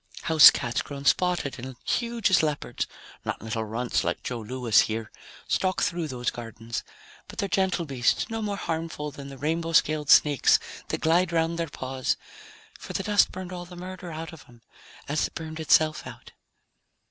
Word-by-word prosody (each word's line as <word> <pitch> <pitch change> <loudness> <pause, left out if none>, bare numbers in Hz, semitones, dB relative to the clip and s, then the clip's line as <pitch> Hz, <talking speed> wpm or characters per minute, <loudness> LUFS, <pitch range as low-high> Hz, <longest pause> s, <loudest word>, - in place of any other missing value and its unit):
Housecats 150 -7 +6
grown 140 -1 -8
spotted 175 -3 +1
and 130 +1 -7
huge 235 -4 0
as 185 - +6
leopards 150 -2 -2 0.4
(not - - -3
little 110 0 -3
runts 115 +3 -1
like - - -2
Joe 125 -2 -3
Louis 120 0 +2
here) 110 0 -3 0.4
stalk 185 -1 +1
through 175 -4 -1
those 125 -3 -2
gardens. 115 -1 -6 0.4
But - - -11
they're 200 - 0
gentle 190 -2 +1
beasts, 130 -5 +1
no 225 0 -4
more 205 -2 -2
harmful 160 -4 -3
than 140 0 -9
the 135 - -10
rainbow 165 +3 -1
scaled 150 -1 +2
snakes 145 -2 +6 0.3
that - - -3
glide 170 +3 +3
around 165 0 +1
their 165 -2 -2
paws, 130 -2 -2 0.6
for - - -8
the 195 - -2
dust 205 +1 +3
burned 185 0 -7
all 175 -1 -6
the 175 0 -12
murder 180 0 -7
out 165 +1 -6
of 160 - -13
them, 120 -1 -19 0.4
as 150 +2 +1
it - - -21
burned 160 0 -6
itself 155 0 +3
out. - - -11
155 Hz, 175 wpm, -26 LUFS, 130-175 Hz, 0.6 s, Housecats